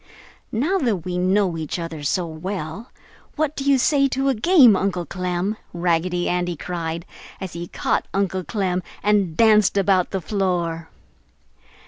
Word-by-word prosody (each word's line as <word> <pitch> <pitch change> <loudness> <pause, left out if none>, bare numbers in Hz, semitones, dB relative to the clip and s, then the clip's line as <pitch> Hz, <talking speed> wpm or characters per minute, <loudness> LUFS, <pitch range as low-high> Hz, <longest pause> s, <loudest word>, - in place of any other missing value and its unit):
"Now 310 - +1
that 215 - -1
we 180 -1 -2
know 185 -1 +2
each 155 +2 -3
other 165 -3 -5
so 170 +5 0
well, 165 +4 -6 0.5
what 310 -1 -1
do 275 - -4
you 280 -1 +4
say 275 +2 +3
to 270 +1 0
a - - +3
game, 255 - +6
Uncle 185 -2 -1
Clem?" 180 +4 -2 0.2
Raggedy 175 +1 0
Andy 175 -1 -1
cried, 170 0 -4 0.3
as 190 -2 -6
he 170 +1 -6
caught - - -1
Uncle 190 -1 -1
Clem 185 -3 -1 0.2
and 200 -6 +2
danced 215 -3 +5
about 190 -2 +3
the 195 - -2
floor. 170 -2 -2
185 Hz, 150 wpm, -22 LUFS, 175-215 Hz, 0.5 s, game